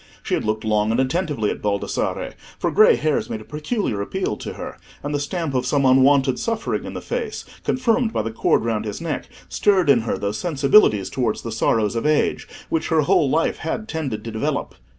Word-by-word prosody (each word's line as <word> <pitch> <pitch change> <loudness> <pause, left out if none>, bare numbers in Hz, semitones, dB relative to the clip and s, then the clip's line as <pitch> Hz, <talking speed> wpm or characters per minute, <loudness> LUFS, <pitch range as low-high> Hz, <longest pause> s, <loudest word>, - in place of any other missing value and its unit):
She - - -3
had - - 0
looked 110 0 -1
long 105 0 +2
and 115 +3 +1
attentively 135 - 0
at - - -6
Baldassarre, 100 -1 -2 0.2
for - - -1
grey - - +6
hairs 155 -1 0
made 110 - -3
a - - -13
peculiar 150 - -2
appeal 185 - -2
to - - -6
her, - - -8 0.2
and 145 +1 -3
the 145 - 0
stamp 155 +1 -3
of 125 -1 0
some 140 +1 +2
unwonted 130 0 +4
suffering 230 -1 -2
in - - -7
the - - -5
face, 470 -3 -4 0.2
confirmed 240 -2 +1
by 110 - -1
the 115 - -3
cord 110 - +1
round 110 -2 -1
his 105 - -4
neck, 165 -2 -4 0.2
stirred 190 -7 +3
in 125 - +5
her 110 -3 -2
those 100 +2 -3
sensibilities 140 - +3
towards 120 -5 -1
the 115 - -5
sorrows 110 0 +1
of 115 +5 0
age, 150 -1 +1 0.2
which 165 - -1
her 160 -1 +3
whole 170 -2 +3
life 160 +4 +1
had 215 +7 -4
tended 150 - -3
to 115 - -6
develop. 110 0 -2
140 Hz, 210 wpm, -22 LUFS, 110-165 Hz, 0.2 s, grey